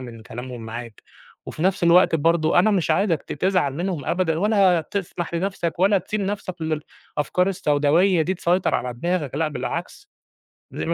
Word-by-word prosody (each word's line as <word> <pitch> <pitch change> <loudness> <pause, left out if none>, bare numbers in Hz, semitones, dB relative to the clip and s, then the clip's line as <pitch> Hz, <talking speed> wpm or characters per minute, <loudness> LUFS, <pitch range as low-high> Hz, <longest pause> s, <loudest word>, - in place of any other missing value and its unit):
من 115 -3 -9
كلامهم 120 +1 -8
معاك. 115 0 -8 0.4
وفي 155 - -6
نَفْس 190 -1 +1
الوقت 170 +1 +5
برضه 165 +1 +2
أنا 215 +4 +4
مش 185 -5 +1
عايزك 165 -2 +1
ت - - -7
تزعل 175 -4 0
منهم 175 -3 -3
أبدًا، 165 -3 0
ولا 195 -3 +3
تسمح 175 0 -5
لنَفْسَك، 170 -2 -2
ولا 195 +1 +4
تسيب 210 +3 -4
نَفْسَك 190 -3 -4
لل 155 -1 -2 0.4
أفكار 180 +6 +1
السوداوية 165 +1 +2
دي 185 +4 -1
تسيطر 175 +1 +1
على 125 0 -1
دماغك، 155 0 -2
لأ 160 0 +1
بالعكس، 175 - -5 0.6
دايمًا 165 - -3
170 Hz, 165 wpm, -23 LUFS, 150-185 Hz, 0.6 s, الوقت